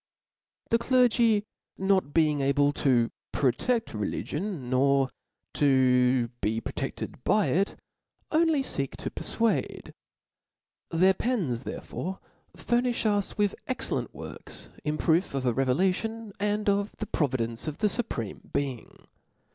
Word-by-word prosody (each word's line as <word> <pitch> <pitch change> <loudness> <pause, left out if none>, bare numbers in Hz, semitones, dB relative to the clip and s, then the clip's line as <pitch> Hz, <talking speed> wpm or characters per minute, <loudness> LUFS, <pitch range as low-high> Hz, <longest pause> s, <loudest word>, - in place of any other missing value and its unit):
The 230 - +4
clergy 235 -4 +3 0.3
not 190 -6 +2
being 150 -2 +3
able 140 +1 +3
to 120 -5 +2 0.2
protcQ: 225 - +1
religion, 150 - -3
nor 135 +1 +3 0.4
to 125 -3 +3
be 110 +2 0
protedbed - - -5
by 210 0 +3
it, 195 +3 +1 0.6
only 315 -3 +3
feek 140 - -3
to - - -4
perfuade: 230 -1 -1 1.0
their 185 +3 +4
pens, 180 - -1
therefore, 190 +2 -5 0.4
furnifh 240 -1 0
us 205 -2 +1
with 205 -2 +2
excellent 255 - -2
works - - -8
in 150 0 -1
proof 165 -2 +2
of 135 -1 -1
a 125 - +2
revelation, 190 - 0
and 210 +1 0
of 200 0 +1
the 215 - -3
providence 125 - -1
of 150 - -3
the 210 - +2
Supreme 195 - -4
Being. 135 -4 -4
170 Hz, 120 wpm, -28 LUFS, 130-215 Hz, 1.0 s, The